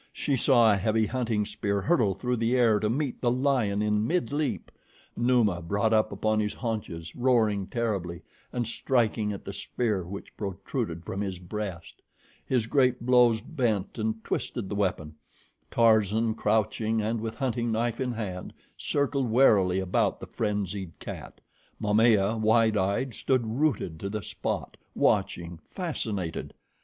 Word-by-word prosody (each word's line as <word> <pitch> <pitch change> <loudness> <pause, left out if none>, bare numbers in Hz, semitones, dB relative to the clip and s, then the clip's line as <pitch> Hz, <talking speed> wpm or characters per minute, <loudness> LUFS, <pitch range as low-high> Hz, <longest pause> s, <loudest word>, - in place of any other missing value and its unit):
She 140 - -1
saw 120 -4 +5
a - - +1
heavy 110 +3 +1
hunting 115 -3 -1
spear 100 0 -1
hurtle 110 - +2
through 125 +5 -1
the 115 +2 +1
air 115 -4 +4
to 105 - 0
meet 135 +2 -2
the 120 - +2
lion 125 -6 +1
in 105 +1 +1
midleap. 150 -3 -1 0.4
Numa 120 -7 +2
brought 100 +6 0
up 110 0 +3
upon 110 +2 0
his 105 -1 -1
haunches, 105 -8 -4
roaring 110 -6 +2
terribly 95 -7 -2 0.3
and 120 -2 -2
striking 115 -3 0
at 100 - -7
the 100 - -5
spear 105 -1 -2
which 95 +3 -9
protruded 100 -2 -4
from 100 - -4
his 95 -3 -3
breast. 90 -1 -6 0.4
His 125 -4 0
great 125 0 +2
blows 120 -3 +5
bent 115 - -2
and 110 0 -2
twisted 105 -6 -3
the 100 - -3
weapon. 90 -6 -1 0.6
Tarzan, 110 -1 +3
crouching 110 +1 0
and 110 +1 -1
with 110 0 -4
hunting 120 -2 -1
knife 115 +2 -1
in 125 -2 -1
hand, 95 -5 -5 0.2
circled 140 -3 0
warily 100 -7 +4
about 95 -1 0
the - - -7
frenzied 100 -4 -3
cat. - - -8 0.4
Momaya, 105 0 +3
wide 110 0 +3
eyed, 105 +6 0
stood 130 +1 0
rooted 115 - -1
to 100 - -4
the 105 -1 -4
spot, - - -4 0.2
watching, 85 -1 0
fascinated. 110 - -4
110 Hz, 150 wpm, -27 LUFS, 100-120 Hz, 0.6 s, saw